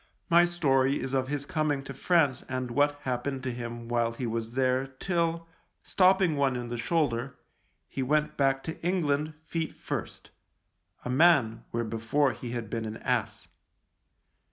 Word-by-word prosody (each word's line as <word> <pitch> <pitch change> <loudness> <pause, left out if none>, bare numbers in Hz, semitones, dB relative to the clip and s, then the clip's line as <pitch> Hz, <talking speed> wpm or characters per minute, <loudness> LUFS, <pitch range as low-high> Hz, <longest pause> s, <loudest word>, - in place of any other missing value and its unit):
My 170 +1 +7
story 140 -6 +2
is 135 - -4
of 130 -1 +1
his 140 0 -3
coming 150 -2 0
to 135 - -7
France 145 -3 +2
and 130 -1 -3
what 145 +3 +2
happened 130 +1 -3
to 130 - -2
him 120 -1 -6
while 120 -1 +1
he 125 +2 -4
was 115 0 -3
there 130 0 +2
till, 165 +4 -1 0.4
stopping 185 -3 +3
one 140 -2 +2
in 120 -1 -4
the 120 - -3
shoulder, 130 -2 0 0.5
he 135 - -4
went 150 +3 +1
back 135 -1 +1
to 160 - -6
England 155 -4 0
feet 165 -1 -3
first - - -6 0.4
— 90 +1 -34
a - - -3
man, 135 -6 +4
where 115 0 -1
before 115 +5 +1
he 120 +2 -7
had 120 -2 -4
been 115 +1 -3
an 110 0 -5
ass. 110 -4 -2
135 Hz, 165 wpm, -28 LUFS, 120-150 Hz, 0.5 s, My